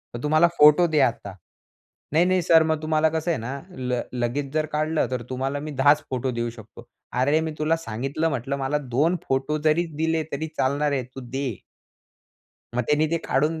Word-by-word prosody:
मग, 120 - -5
"तू - - 0
मला 155 +2 +5
फोटो 150 +4 +7
दे 155 -2 +1
आता." 100 -4 -9 0.8
"नाही, 170 +3 +4
नाही 185 0 +2
सर, 165 -1 +5
मग 160 -1 -1
तुम्हाला 155 0 +2
कसं 160 +2 -2
आहे - - 0
ना 135 +4 -5 0.2
ल 125 -1 -1 0.2
लगेच 135 +3 -2
जर 155 0 +1
काढलं 155 +1 0
तर 125 -2 -2
तुम्हाला 135 +2 -2
मी 150 +1 -6
10च 145 +3 +4
फोटो 130 0 -2
देऊ 120 0 -2
शकतो." 115 +1 -13 0.3
अरे 145 +4 +3
मी 160 -1 -3
तुला 155 +2 +2
सांगितलं, 135 +4 -2
म्हटलं, 135 0 -2
"मला 135 +2 -1 0.2
2 165 +5 +3
फोटो 135 +3 0
जरी 160 +3 +3
दिले 160 0 0
तरी 155 +3 -3
चालणार 145 +2 +1
आहे. 135 -3 0
तू 130 +2 -11
दे." 135 -6 -3 1.1
मग 125 - +1
त्यांनी 150 +1 +2
ते 170 - +1
काढून 155 +4 +1
150 Hz, 195 wpm, -24 LUFS, 130-160 Hz, 1.1 s, फोटो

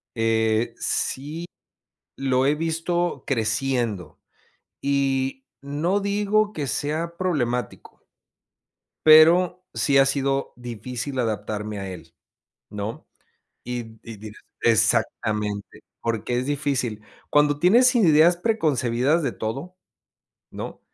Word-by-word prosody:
eh, 110 0 +1
sí 150 +5 -3 0.7
lo 130 -1 +1
he 145 - +3
visto 165 +2 -1
creciendo 115 - -1 0.6
y 135 -1 0 0.2
no 155 +8 -1
digo 205 +1 +1
que 150 -7 -3
sea 160 +5 -2
problemático 125 - -2 1.1
pero, 170 +3 +6
sí 140 -1 +2
ha 135 - +6
sido 135 0 -1
difícil 125 +2 -6
adaptarme 105 -2 -3
a 95 -1 -5
él, 85 -2 -11 0.6
¿no? 105 +2 -5 0.6
Y 115 -2 -6
y 115 - -9
dirá 105 +1 -11 0.2
exactamente, 110 -2 0 0.2
porque, 115 +1 -2
es 125 - -3
difícil, 135 -7 -2 0.3
cuando 145 0 +3
tienes 240 - +5
ideas 170 -5 +5
preconcebidas 155 - +1
de 135 - -1
todo, 135 +12 -5 0.8
¿no? - - -7
135 Hz, 100 wpm, -24 LUFS, 115-160 Hz, 1.1 s, pero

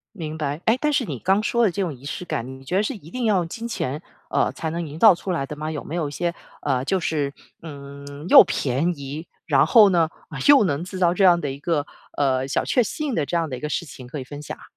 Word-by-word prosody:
明 160 -4 -5
白， 150 +1 -3
诶， 225 +3 +4
但 300 - +2
是 280 -4 +1
你 140 - -5
刚 195 +2 +2
说 235 +1 +1
的 205 - +3
这 200 - -3
种 175 -5 -2
仪 130 0 -15
式 160 +5 -5
感， 145 -8 -3
你 - - -15
觉 180 - -2
得 200 - +3
是 240 - -2
一 180 - -12
定 250 +5 -4
要 210 -4 +3
用 170 -2 -1
金 230 +7 -7
钱， 150 - -3 0.3
呃， - - +1
才 160 - -4
能 170 +1 -3
营 150 +2 -8
造 220 -5 +8
出 185 +2 -5
来 150 -6 -1
的 150 - -7
吗？ 155 +1 -4
有 150 - -5
没 165 - -5
有 155 -4 -1
一 - - -10
些， 170 +3 -2 0.3
呃， 130 -3 0
就 190 +6 0
是， 145 -4 -1 0.3
嗯， 140 0 -9
又 - - +10
便 140 +5 0
宜， 145 +4 -6 0.2
然 145 -3 +4
后 210 +5 +7
呢， 170 -3 +2 0.4
又 275 -7 +8
能 155 -1 -1
制 185 +1 -7
造 175 -1 +3
这 195 +2 +1
样 175 -2 +6
的 145 -4 -3
一 135 +1 -6
个， 150 -2 0 0.3
呃， 130 -2 +1
小 - - -1
确 250 - +3
幸 285 +4 -3
的 150 - 0
这 170 - -1
样 165 -2 -1
的 130 - -4
一 125 - -8
个 150 - -3
事 170 - -2
情 130 -4 -11
可 125 +4 -6
以 - - -5
分 145 +2 -8
享 150 - -7
啊？ - - -17
160 Hz, 300 characters per minute, -23 LUFS, 140-185 Hz, 0.4 s, 又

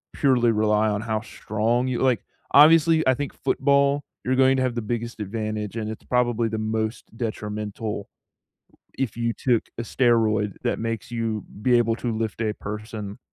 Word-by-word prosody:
purely 125 -4 +3
rely 105 0 +2
on 105 0 -1
how 110 -1 -2
strong 115 +4 -1
you 125 - -1
like, 125 -6 +2 0.3
obviously, 160 +1 +6
I 130 - +6
think 140 +1 -3
football, 140 +1 +2 0.2
you're 130 +1 +1
going 130 0 +4
to 130 - +1
have 125 -2 0
the 120 - -2
biggest 115 +1 -4
advantage, 105 0 -4
and 110 -1 -3
it's 110 - -9
probably 120 -2 +1
the 110 - -3
most 110 +1 -3
detrimental 105 -2 -4 0.9
if 130 -4 -2
you 115 0 0
took 120 -2 +1 0.2
a - - -1
steroid 110 -4 +2
that - - 0
makes 115 -2 -4
you 115 -3 -2 0.2
be 125 -1 +4
able 115 -1 +1
to 120 -2 -3
lift 110 0 -3
a 110 -1 0
person 105 -1 -7
115 Hz, 170 wpm, -24 LUFS, 110-125 Hz, 0.9 s, obviously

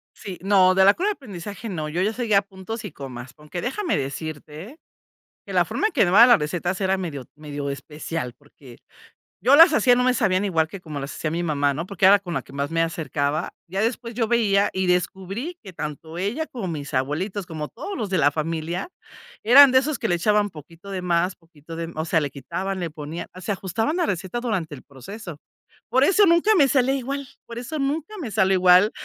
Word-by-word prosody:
Sí, 190 -3 -8
no, 190 -2 +4
de 190 0 +5
la 200 - +8
curva 390 +4 -1
de - - +2
aprendizaje, 210 - -8
no, 155 -5 -4
yo 170 +4 -1
ya 215 +3 +1
seguía 215 -4 +2
puntos 200 +3 -8
y 190 - -6
comas, 130 -2 -9
aunque, 150 +4 -7
déjame 335 +9 -1
decirte, 155 - -6 0.7
que - - -7
la - - +3
forma 430 - 0
en - - -11
que 260 - -1
me - - +1
daban 235 +5 +8
las 240 - +7
recetas 175 +5 -2
era 190 0 +1
medio 150 -8 -5
medio 145 -2 -5
especial 140 -1 -5
porque 140 -4 -17 0.6
yo 265 +5 +6
las 330 +2 +9
hacía, 250 -4 +5
no 250 - +2
me 255 - +3
sabían 195 -3 +1
igual 160 -5 +1
que 195 +1 -9
como 150 -4 -6
las 140 +1 -6
hacía 155 - -2
mi 170 +1 -2
mamá, 145 -3 +1
¿no? 165 +4 -3
Porque 190 -1 0
era 200 +1 +8
con 180 -4 -6
la - - -1
que - - -17
más 140 +2 -3
me 165 0 +1
acercaba. 155 -1 -2 0.2
Ya 190 +3 -2
después 230 0 -2
yo 230 -3 0
veía 205 -4 +3
y 190 -1 -1
descubrí 190 - -2
que 190 -3 -10
tanto 160 +1 -6
ella 235 - -2
como 230 -9 -6
mis 145 -4 -5
abuelitos, 175 +10 -2
como 155 -3 -5
todos 400 - -7
los 215 -6 -3
de 185 - +1
la 145 -1 +4
familia, 165 - -3 0.5
eran 265 +4 +8
de 260 - +6
esos 290 +2 -2
que - - -1
le 175 - +2
echaban 210 +3 +2
poquito 165 +4 -13
de 185 -2 -4
más, 180 +1 +1
poquito 165 -1 -13
de 165 0 -4
me 170 - -10
o 160 - -1
sea, 160 - +2
le 145 -3 -3
quitaban, 190 +8 -4
le 170 -2 -3
ponían, 150 +2 -7
se 185 - -4
ajustaban 205 - -2
la 345 - +1
receta 190 +6 -3
durante 200 -11 -2
el 130 - -14
proceso. 165 - -10 0.5
Por 260 +3 +3
eso 400 +7 +5
nunca 340 +5 +4
me 285 -6 +5
sale 265 0 +2
igual, 275 +1 -4 0.2
por 235 - -9
eso 270 +6 -5
nunca 300 +8 -2
me 245 -8 -5
sale 190 0 +3
igual. 185 +3 +6
185 Hz, 225 wpm, -23 LUFS, 155-230 Hz, 0.7 s, las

